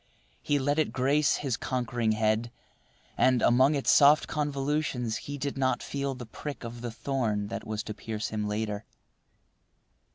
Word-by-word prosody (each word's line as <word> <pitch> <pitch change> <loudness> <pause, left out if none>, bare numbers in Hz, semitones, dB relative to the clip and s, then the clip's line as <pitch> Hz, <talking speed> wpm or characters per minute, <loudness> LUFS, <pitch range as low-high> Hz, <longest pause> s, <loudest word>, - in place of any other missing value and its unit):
He 145 - +1
let 145 +2 +1
it 155 - +1
grace 140 +3 +2
his 135 -5 -2
conquering 120 -3 -1
head, 110 +2 +1 0.7
and, 130 -2 +3
among 130 +5 +5
its 140 - +2
soft 145 +1 +6
convolutions, 140 -5 -1
he 145 0 -6
did 140 0 -3
not 130 -1 +1
feel 140 -1 -3
the 125 -1 -8
prick 140 +6 -7
of 115 0 -7
the 120 - -3
thorn 110 -4 -2
that 115 - -5
was 105 -1 -3
to 105 - -5
pierce 110 +1 -4
him 105 -1 -2
later. 105 0 -2
125 Hz, 160 wpm, -28 LUFS, 110-140 Hz, 0.7 s, soft